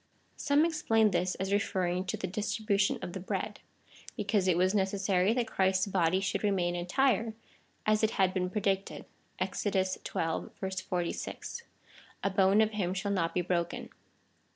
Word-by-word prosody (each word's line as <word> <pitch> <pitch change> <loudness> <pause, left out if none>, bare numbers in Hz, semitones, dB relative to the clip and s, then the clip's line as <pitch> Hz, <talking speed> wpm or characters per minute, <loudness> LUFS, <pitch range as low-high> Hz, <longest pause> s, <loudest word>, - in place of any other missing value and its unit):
Some 295 +2 +3
explain 225 -10 +2
this 180 +1 0
as 190 +1 -2
referring 185 -2 0
to 185 - -2
the - - -3
distribution 205 +1 0
of 175 - -5
the 190 - -4
bread, 185 - -3 0.6
because 205 -3 +1
it 175 -2 +3
was 185 +2 +3
necessary 195 -1 +2
that 245 -1 0
Christ's 190 -2 +1
body 185 -2 +2
should 200 +2 -2
remain 185 -4 +1
entire, 220 +5 +1 0.5
as 215 0 +3
it 220 - +3
had 190 -2 +3
been 180 -1 0
pre 210 +3 -2
dicted, 195 0 -1 0.3
(Exod. 205 - -2
xii. 185 0 -2 0.2
46,) 180 - -3 0.6
A 200 - +2
bone 195 +2 +4
of 220 0 +2
him 190 -4 -1
shall 200 +2 -2
not 165 -4 0
be 180 - +2
broken. 175 -1 -2
195 Hz, 155 wpm, -30 LUFS, 180-210 Hz, 0.6 s, bone